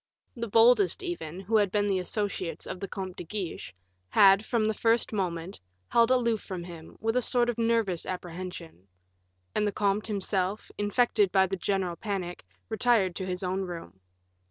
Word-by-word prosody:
The 235 -1 -4
boldest, 245 - +5
even, 190 - -5
who 215 +4 +2
had 205 -3 +2
been 205 0 +1
the 195 -2 +1
associates 190 -2 -2
of - - -6
the 195 - -4
Comte 190 -2 -6
de - - -5
Guiche, 180 - -5 0.4
had, 195 - +6
from 225 -1 0
the 220 - +1
first 230 +1 +1
moment, 180 -2 -3 0.3
held 235 0 +4
aloof 235 -4 +2
from 185 -3 -6
him, 170 -2 -11
with 225 +1 -1
a 250 - +3
sort 240 0 +1
of 235 - -10
nervous 225 -6 +1
apprehension; 175 - -7 0.7
and 210 0 +1
the - - 0
comte 205 +1 0
himself, 195 -1 -2
infected 205 -1 +2
by 190 -1 +5
the 190 +1 -2
general 185 -2 -1
panic, 190 - -4 0.2
retired 200 - +2
to 190 - -4
his 180 0 -3
own 185 +1 -1
room. 170 - -7
195 Hz, 175 wpm, -28 LUFS, 180-225 Hz, 0.7 s, had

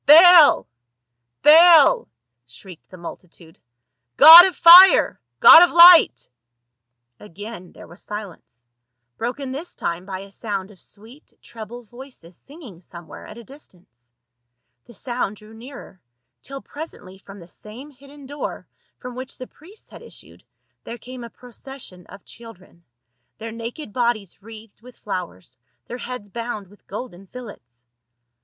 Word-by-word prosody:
" - - -56
Baal! 330 +1 +5 0.8
Baal 320 +1 +4 0.2
!" 120 0 -60
shrieked 160 +8 -17
the 185 - -15
multitude, 170 -1 -15 0.3
" 120 0 -58
god 335 +3 +10
of 380 - -4
fire! 360 +3 +5 0.2
god 325 - +7
of 355 - +1
light 345 0 +5 0.5
!" 120 0 -59
Again 205 0 -13
there - - -16
was 175 - -18
silence, 190 - -12 0.5
broken 260 +3 -7
this 295 +7 -10
time 175 +2 -7
by 190 -1 -8
a 200 0 -16
sound 200 -2 -8
of 190 - -22
sweet 225 +8 -18
treble 235 +2 -13
voices 240 -7 -17
singing 270 - -16
somewhere 170 -1 -14
at - - -14
a 235 - -14
distance; 180 - -21 0.7
the 235 - -19
sound 240 -2 -7
drew 215 +1 -19
nearer, 225 -5 -15 0.4
till 275 0 -12
presently 205 - -13
from 195 0 -16
the 170 -3 -16
same 230 +10 -15
hidden 280 +1 -18
door 285 +2 -9 0.3
from 250 -1 -12
which 255 +2 -11
the 255 - -11
priests 360 - -22
had - - -16
issued - - -16 0.4
there 235 - -11
came 250 0 -13
a 235 - -11
procession 245 -6 -15
of 195 - -17
children, 190 -7 -17 0.5
their 225 0 -10
naked 230 +2 -11
bodies 235 -7 -5
wreathed 220 0 -17
with 250 +1 -19
flowers, 175 - -10 0.3
their 245 - -11
heads 245 -4 -10
bound 220 -2 -9
with 205 - -25
golden 195 -3 -11
fillets. 120 - -15
225 Hz, 145 wpm, -19 LUFS, 185-270 Hz, 0.8 s, god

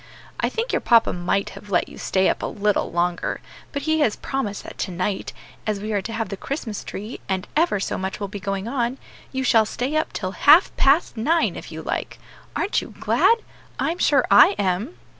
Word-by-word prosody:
I - - +1
think 465 +2 -2
your - - +3
papa 230 -1 +4
might 180 +3 -1
have 205 - -12
let 180 - +2
you - - -12
stay 190 0 +2
up - - 0
a - - -1
little 210 -1 0
longer; 175 0 -1 0.3
but 285 -2 -4
he 315 +1 +1
has 245 -8 +2
promised 225 -7 -3
that - - -11
tonight 185 +2 -2 0.4
as 210 -2 0
we 215 +2 -4
are 200 - +1
to 225 - -6
have 225 0 -2
the 195 - -5
Christmas 235 -3 -4
tree, 215 +5 -7
and 190 -1 -1
ever 315 - +2
so 190 - -2
much 190 0 -4
will 200 - -3
be 205 +1 -7
going 195 +1 -3
on 245 0 -1 0.3
you 265 0 -2
shall 230 -3 +5
stay 255 +7 -2
up 310 - 0
till 185 -2 -3
half 300 - +5
past 275 -2 +3
nine, 320 +9 +2
if - - -8
you - - -7
like. - - -3 0.4
Aren't 405 - +1
you - - -11
glad? 460 -1 +3 0.3
I'm 340 +2 -1
sure 280 -4 +4
I 200 - +8
am." 200 - -1
220 Hz, 210 wpm, -23 LUFS, 195-280 Hz, 0.4 s, I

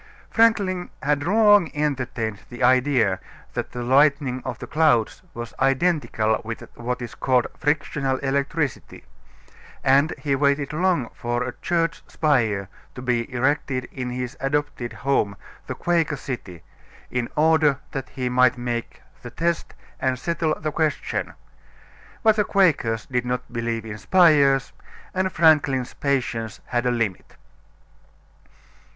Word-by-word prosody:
Franklin 200 -6 +2
had 145 0 +1
long 205 +1 +5
entertained 130 -7 -2
the 120 0 -5
idea 125 -6 +3 0.3
that - - -4
the 120 0 -5
lightning 135 0 +3
of 125 -4 -4
the - - -7
clouds 135 -8 +2
was 120 -1 -6
identical 135 -6 +1
with 115 +1 -6
what 125 +1 -3
is 115 -2 -7
called 125 +2 +2
frictional 145 -2 0
electricity, 140 0 -2 0.8
and 140 +4 +4
he 140 -2 -1
waited 140 +1 +1
long 170 -7 +1
for 120 +1 -2
a 125 -1 -4
church 165 -1 0
spire 110 -10 +1 0.3
to 125 - -7
be 120 -2 -1
erected 130 +1 0
in 125 -2 -4
his 125 +1 -4
adopted 135 -3 -2
home, 110 -3 0 0.3
the - - -4
Quaker 165 -4 0
City, 110 -11 -7 0.5
in 125 -1 -1
order 155 -2 +4
that 135 -2 -5
he 130 -1 -3
might 125 0 +3
make 120 -1 -4 0.2
the 120 - -8
test 170 +7 -2 0.2
and 130 -1 0
settle 160 +2 -1
the 155 -1 -2
question. 155 0 -1 0.9
But 220 -1 +5
the 210 - +4
Quakers 150 - +2
did 125 -2 -1
not 125 0 -4
believe 115 -1 -2
in 110 -1 -7
spires, 145 - +4 0.4
and 185 0 0
Franklin's 150 -6 +3
patience 120 -5 -2
had 120 0 -1
a - - +3
limit. 115 -6 -2
135 Hz, 135 wpm, -23 LUFS, 120-155 Hz, 0.9 s, long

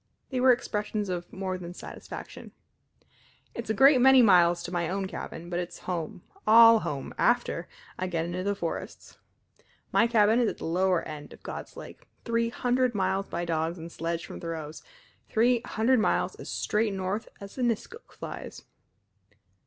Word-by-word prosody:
They 255 - -1
were 255 0 +6
expressions 210 -4 -1
of 175 -1 -4
more 190 -1 -4
than 175 0 -8
satisfaction. - - -9 1.0
"It's 235 -2 -6
a - - +2
great 270 +2 +6
many 265 -1 +7
miles 175 -4 +5
to 175 - -6
my 170 -2 -1
own 190 +1 -2
cabin, 170 -2 -7
but 175 0 -2
it's 175 -1 -5
home 175 -1 -4 0.2
all 230 +1 +8
home 140 -9 -5
after - - +1 0.3
I 185 - -1
get 165 -2 -1
into 175 +2 -3
the 200 +2 -1
forests. 170 -4 -6 0.7
My 235 - +4
cabin 225 0 +4
is 235 -3 +3
at - - -6
the - - -7
lower 180 +1 +1
end 150 -1 -8
of - - -17
God's - - -7
Lake, - - -11 0.2
three 230 0 +1
hundred 250 0 0
miles 190 0 0
by 170 +1 -3
dogs 165 +1 -1
and 165 0 -8
sledge 165 0 -3
from - - -9
Thoreau's 160 -2 -6 0.5
three 235 +1 +3
hundred 235 +3 +2
miles 215 - +1
as - - -10
straight 210 -1 0
north 190 +3 -3
as 200 +5 -10
a - - -1
niskuk 235 -3 -2
flies." - - -8
190 Hz, 170 wpm, -28 LUFS, 175-230 Hz, 1.0 s, all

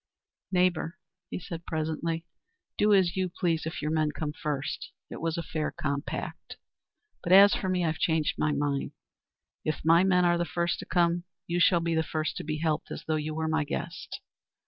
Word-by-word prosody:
"Neighbour," 180 -2 +1 0.3
he - - -4
said 170 -2 -7
presently, 160 +1 -2 0.5
"do 210 0 +3
as 190 -4 +4
you 185 -1 0
please 165 -2 -1
if 160 - -5
your 150 - 0
men 155 -1 +2
come 150 -1 -4
first. 150 -2 -3 0.2
It - - -7
was 165 +1 -1
a 170 - -2
fair 155 -1 -2
compact. 140 0 -4 0.6
But 175 - +2
as 200 +1 +9
for 190 - -1
me, 180 -1 +1
I've 160 0 -1
changed 160 -2 +1
my 150 - +2
mind. 145 -1 -1 0.7
If 155 0 -2
my 165 +2 +6
men 180 -2 +4
are 175 0 +3
the - - +2
first 170 +1 -1
to - - -7
come 175 0 +2 0.2
you 175 0 -1
shall 170 0 +5
be 165 0 0
the 160 - +3
first 155 -1 -2
to - - -4
be 155 0 -2
helped, 155 -1 -1
as - - -6
though 155 - 0
you 155 0 -2
were 160 0 -1
my 160 0 +1
guest. 165 +3 -5
165 Hz, 195 wpm, -28 LUFS, 155-175 Hz, 0.7 s, as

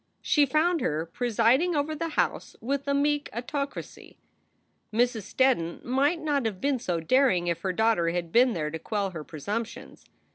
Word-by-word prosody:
She 290 -2 +3
found 320 +4 +2
her 155 +2 -1
presiding 245 - +2
over 295 +1 0
the 330 +2 -3
house - - -1
with 275 +4 -3
a 280 - +2
meek 290 +1 +1
autocracy. 275 +5 -5 0.7
Mrs. 230 -2 0
Steddon 250 -11 +1
might 280 +7 +1
not 285 -6 0
have 200 -4 -5
been 275 +1 0
so 180 -8 -2
daring 210 - +3
if 170 -1 -1
her 190 - -1
daugh 220 +4 +2
ter 170 -1 +1
had 170 -1 -3
been 245 +3 +4
there 150 -4 -2
to 160 - -5
quell 200 +1 -2
her 160 -4 -7
presumptions. 220 - -6
240 Hz, 175 wpm, -27 LUFS, 180-280 Hz, 0.7 s, been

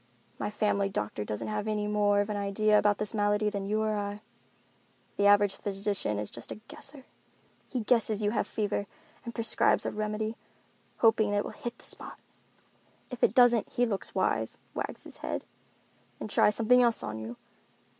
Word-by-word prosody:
My - - -1
family 205 -1 +1
doctor 105 - -3
doesn't 105 0 -4
have 210 0 -2
any 210 -1 0
more 205 -1 +3
of 205 +1 -2
an - - -2
idea 210 +1 +3
about 205 -1 +3
this 210 +1 -2
malady 210 0 +2
than 200 -1 -3
you 215 +1 +1
or 215 0 0
I. 205 0 -3 1.0
The 200 - +4
average 205 -1 +5
physician 200 - -2
is 105 0 -4
just 115 - -7
a - - -4
guesser. 265 +5 -6 0.6
He 250 - -2
guesses 220 -2 +3
you 205 - +2
have 220 - 0
a - - -18
fever 205 -1 -1 0.4
and 235 -2 -7
prescribes 230 -1 +2
a - - -1
remedy, 215 +1 -3 0.6
hoping 225 -2 +4
that 205 - +1
it 205 - +1
will - - -5
hit 240 0 -6
the - - -12
spot. - - -8 0.9
If 250 - -6
it - - +4
doesn't 240 -3 +5
he 245 - +1
looks 205 -5 -4
wise, - - 0 0.2
wags - - -4
his - - -11
head—and 215 - -9
tries 210 - +4
something 250 +2 +5
else 235 -2 +3
on 110 +1 -4
you. 115 +2 -7
210 Hz, 185 wpm, -29 LUFS, 205-220 Hz, 1.0 s, average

